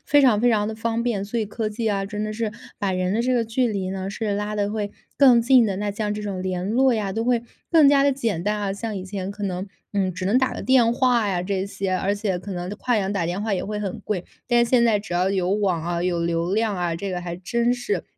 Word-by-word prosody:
非 290 0 +5
常， 225 -6 +5
非 245 - +4
常 210 -2 +2
的 - - -3
方 230 +1 -2
便。 215 -5 -1
所 230 +3 -3
以 - - 0
科 215 +1 -3
技 220 +1 -2
啊， 195 -1 -1
真 210 0 -4
的 215 0 -3
是 215 -1 -2 0.3
把 195 -2 0
人 185 +1 0
的 225 - +1
这 255 +1 +1
个 235 -2 +2
距 240 +3 +1
离 195 -4 -2
呢， 190 0 -4
是 205 0 -2
拉 210 +1 -3
得 205 0 0
会 210 -2 -3 0.2
更 250 -4 +6
近 250 -2 +5
的， 195 - -1
那 205 0 -1
像 210 0 -2
这 210 - -5
种 195 -3 -4
联 185 -1 -2
络 255 +1 +4
呀， 205 -3 -1
都 225 +2 -2
会 240 -1 +2 0.3
更 315 -4 +7
加 280 -1 +5
地 280 - +4
简 225 -10 -1
单 210 0 +1
啊。 200 -2 -2
像 210 +1 -4
以 185 - -4
前 195 0 -5
可 205 0 -9
能， 185 0 -2 0.3
嗯， 190 -3 0
只 185 - -4
能 215 +7 +3
打 260 - +1
个 - - -5
电 245 -3 +4
话 240 -4 +2
呀， 180 -2 0
这 195 0 -2
些， 195 -1 -3
而 195 +2 0
且 200 -3 -1
可 195 +2 -7
能 180 +1 -4
跨 235 +3 -1
洋 195 0 -1
打 175 -4 -1
电 180 +4 -2
话 220 -2 -1
也 185 - -1
会 210 0 -4
很 200 +2 -4
贵。 185 -4 -2 0.2
但 240 -1 +4
现 235 0 +3
在 215 -3 +3
只 200 -4 -8
要 180 +2 +2
有 185 -2 0
网 195 -5 +1
啊， 170 0 -2
有 175 -2 0
流 170 +3 0
量 220 -3 +1
啊， 175 -2 -1
这 195 +3 -4
个 180 -1 -3
还 175 -1 -5
真 235 +7 0
是。 250 +12 -2
205 Hz, 295 characters per minute, -23 LUFS, 190-230 Hz, 0.3 s, 更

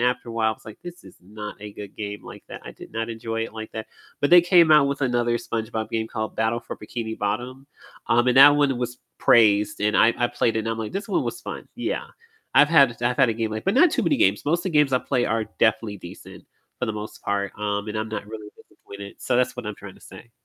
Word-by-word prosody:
after 125 0 0
a - - -6
while, 110 -1 +1
I - - -1
was - - -16
like, 110 - -10
"This 175 0 -10
is - - -15
not 105 +3 -8
a 105 0 -8
good 100 -1 -10
game 105 -1 -6
like - - -11
that." - - -9
I - - -9
did - - -13
not 115 0 -3
enjoy 115 0 -4
it 115 - -10
like 110 0 -7
that. 110 -1 -6 0.3
But 145 - +1
they 175 0 +9
came 175 -3 +5
out 150 -2 +6
with 140 0 -3
another 120 -2 +1
SpongeBob 110 -1 -4
game 110 0 -2
called 110 -1 -4
Battle 115 +1 0
for - - -8
Bikini 110 +1 -6
Bottom, 125 +6 -3 0.4
um, 120 +1 +3
and 125 - +2
that 145 +2 +9
one 140 -3 +2
was 125 0 -4 0.2
praised, 105 -2 +4
and 105 +1 +1
I 115 - +5
I 120 - +2
played 115 -1 0
it - - +2
and 115 - -4
I'm 115 0 -2
like, 110 -1 -5
"This 200 +1 -4
one 200 - +1
was - - -4
fun." - - -8
Yeah, - - -3 0.5
I've 145 - +6
had 140 -8 +4
I've 125 +1 +1
had 135 -3 +4
a 115 - 0
game 115 -1 -2
like 110 - -5
But 195 - +1
not 335 +5 +6
too - - 0
many 290 - +2
games. - - +2
Most 170 +4 +1
of - - -11
the 185 - -1
games 150 -3 +3
I 130 - +4
play 125 -1 -1
are 110 0 0 0.2
definitely 110 -2 +1
decent 85 - -12 0.4
for - - 0
the 110 - -2
most 105 0 -8
part, 100 -1 -2
um, 105 0 -2
and 105 - -4
I'm 110 +1 -3
not 110 -1 -5
really 110 -1 -9
disappointed. 100 0 -12
So 125 - 0
that's 125 0 +1
what 125 - -6
I'm 105 - -4
trying 100 -2 -11
to - - -20
say. 95 +5 -14
115 Hz, 265 wpm, -23 LUFS, 105-130 Hz, 0.5 s, they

